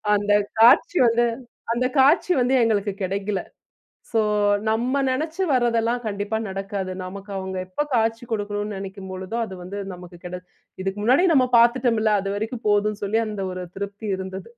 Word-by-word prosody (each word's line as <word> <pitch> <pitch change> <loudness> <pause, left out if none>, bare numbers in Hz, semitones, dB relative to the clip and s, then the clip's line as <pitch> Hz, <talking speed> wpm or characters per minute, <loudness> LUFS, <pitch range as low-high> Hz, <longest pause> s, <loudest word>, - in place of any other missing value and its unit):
அந்த 205 0 0 0.3
காட்சி 335 +9 +6
வந்து, 235 +1 +3 0.5
அந்த 245 +2 0
காட்சி 300 +7 +4
வந்து 250 +2 +2
எங்களுக்கு 210 -2 +1
கிடைக்கல. 195 +1 -2 0.7
சோ 225 - +3 0.5
நம்ம 240 +5 +1
நெனைச்சு 315 +8 -2
வர்றதெல்லாம் 240 -2 +1
கண்டிப்பா 205 0 -2
நடக்காது. 195 -1 -4
நமக்கு 195 +2 -8
அவுங்க 190 0 -4
எப்ப 185 +10 -2
காட்சி 225 0 +1
கொடுக்கணும்ன்னு 205 -1 -3
நினைக்கும் 195 -1 -8
பொழுதோ, 185 +4 -5
அது 190 - -8
வந்து 195 +3 -6
நமக்கு 180 0 -11
கிடை 180 0 -5 0.4
இதுக்கு 195 +1 -3
முன்னாடியே 285 - +4
நம்ம 255 -2 +5
பாத்துட்டோம்ல்ல 230 -2 +3
அது 195 - -4
வரைக்கும் 225 +3 -4
போதும்ன்னு 210 0 +1
சொல்லி 220 +3 +1
அந்த 210 -2 -5
ஒரு 185 0 -5
திருப்தி 200 +2 -5
இருந்தது. 190 +2 -7
210 Hz, 150 wpm, -23 LUFS, 195-235 Hz, 0.7 s, காட்சி